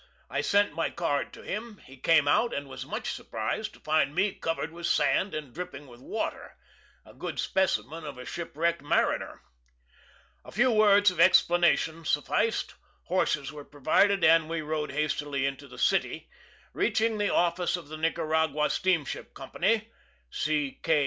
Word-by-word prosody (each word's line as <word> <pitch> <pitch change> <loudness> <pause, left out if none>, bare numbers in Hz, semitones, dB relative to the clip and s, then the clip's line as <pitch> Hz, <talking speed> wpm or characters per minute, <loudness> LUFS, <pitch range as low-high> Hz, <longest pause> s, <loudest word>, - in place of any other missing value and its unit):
I - - 0
sent 205 -3 +2
my 165 +2 -1
card 145 -5 -1
to - - -12
him; 215 +1 -5
he 135 - -13
came 150 +2 +3
out, 230 +11 +2
and 140 0 -4
was 135 0 -8
much - - -3
surprised 110 - -4
to - - -18
find 155 -2 +1
me 195 +2 +2
covered 165 -1 -3
with 170 +1 -4
sand, 195 -2 +2
and 150 -5 -6
dripping 150 -5 -7
with 120 -3 -15
water, 220 +10 -5 0.5
a - - -15
good - - -6
specimen 165 -4 0
of 145 -3 -7
a 125 - -8
shipwrecked 170 +2 -2
mariner. 145 - 0 1.0
A - - -12
few 245 +4 +3
words 205 -2 +5
of 180 - -9
explanation 175 -2 +4
sufficed; 160 +10 0 0.3
horses 150 -6 0
were 150 -1 -8
provided, 165 +8 +2
and 160 0 +5
we 165 -1 -2
rode 150 -1 -3
hastily 145 -1 -1
into 135 -1 -4
the - - -13
city, - - 0 0.4
reaching 220 -1 +1
the 205 - +1
office 175 0 +1
of 170 -4 -11
the 155 +1 -7
Nicaragua 160 -2 0
Steamship 175 -7 -1
Company 215 +11 -1 0.4
(C. 150 -2 -1
K. 160 -2 +3
165 Hz, 160 wpm, -28 LUFS, 145-185 Hz, 1.0 s, words